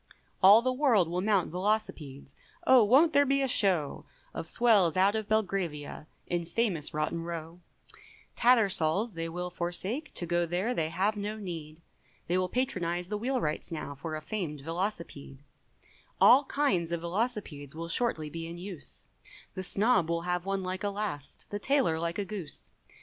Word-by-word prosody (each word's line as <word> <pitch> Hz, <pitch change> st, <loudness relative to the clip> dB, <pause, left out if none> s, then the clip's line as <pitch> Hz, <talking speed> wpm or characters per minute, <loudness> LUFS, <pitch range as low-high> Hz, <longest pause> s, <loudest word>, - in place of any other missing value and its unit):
All 205 Hz, +4 st, +8 dB
the 255 Hz, 0 st, +1 dB
world 250 Hz, -, +3 dB
will 175 Hz, +2 st, -2 dB
mount 200 Hz, -4 st, +1 dB
velocipedes, 170 Hz, -8 st, -3 dB, 0.3 s
Oh 255 Hz, -3 st, +7 dB
wont 280 Hz, +10 st, +5 dB
there 285 Hz, -, +6 dB
be 275 Hz, 0 st, +1 dB
a -, -, +1 dB
show 185 Hz, -, +2 dB, 0.3 s
Of 160 Hz, -, -5 dB
swells 200 Hz, -5 st, +3 dB
out 195 Hz, +2 st, +4 dB
of 220 Hz, -2 st, -2 dB
Belgravia, 185 Hz, -9 st, -2 dB, 0.2 s
In 175 Hz, -1 st, -1 dB
famous 175 Hz, -4 st, -1 dB
Rotten 155 Hz, +2 st, -2 dB
Row; 165 Hz, 0 st, -6 dB, 0.8 s
Tattersall's 215 Hz, -4 st, +3 dB
they 165 Hz, -2 st, -4 dB
will 180 Hz, +1 st, -4 dB
forsake, 185 Hz, -, -3 dB
To 175 Hz, -, -4 dB
go 175 Hz, 0 st, 0 dB
there 185 Hz, +8 st, -1 dB
they 160 Hz, -8 st, -1 dB
have 200 Hz, +6 st, 0 dB
no 210 Hz, +1 st, -4 dB
need, 165 Hz, -5 st, -7 dB, 0.4 s
They 175 Hz, -, -1 dB
will 185 Hz, 0 st, +1 dB
patronise 180 Hz, -9 st, -1 dB
the 210 Hz, -, -2 dB
wheel 255 Hz, +3 st, 0 dB
wright's 155 Hz, -2 st, -3 dB
now 155 Hz, -3 st, -5 dB
For 155 Hz, +3 st, -6 dB
a 155 Hz, -, -6 dB
famed 160 Hz, -7 st, -4 dB
Velocipede, 165 Hz, -5 st, -5 dB, 0.8 s
All 270 Hz, +4 st, +7 dB
kinds 190 Hz, -, 0 dB
of 170 Hz, -1 st, -2 dB
Velocipedes 170 Hz, -, -3 dB
Will 165 Hz, +1 st, -5 dB
shortly 165 Hz, -5 st, 0 dB
be 165 Hz, +1 st, -5 dB
in 170 Hz, +1 st, -7 dB
use, 180 Hz, -3 st, -8 dB, 0.5 s
The 185 Hz, -, -4 dB
snob 200 Hz, -1 st, +2 dB
will 170 Hz, 0 st, -1 dB
have 180 Hz, +1 st, -2 dB
one 195 Hz, -1 st, -1 dB
like 185 Hz, +1 st, -4 dB
a 205 Hz, -, +1 dB
last, 200 Hz, -9 st, -5 dB
The 205 Hz, -, -3 dB
tailor 255 Hz, -, +1 dB
like 170 Hz, +1 st, -2 dB
a 205 Hz, -, -2 dB
goose! 190 Hz, -8 st, -7 dB
180 Hz, 170 wpm, -29 LUFS, 165-215 Hz, 0.8 s, All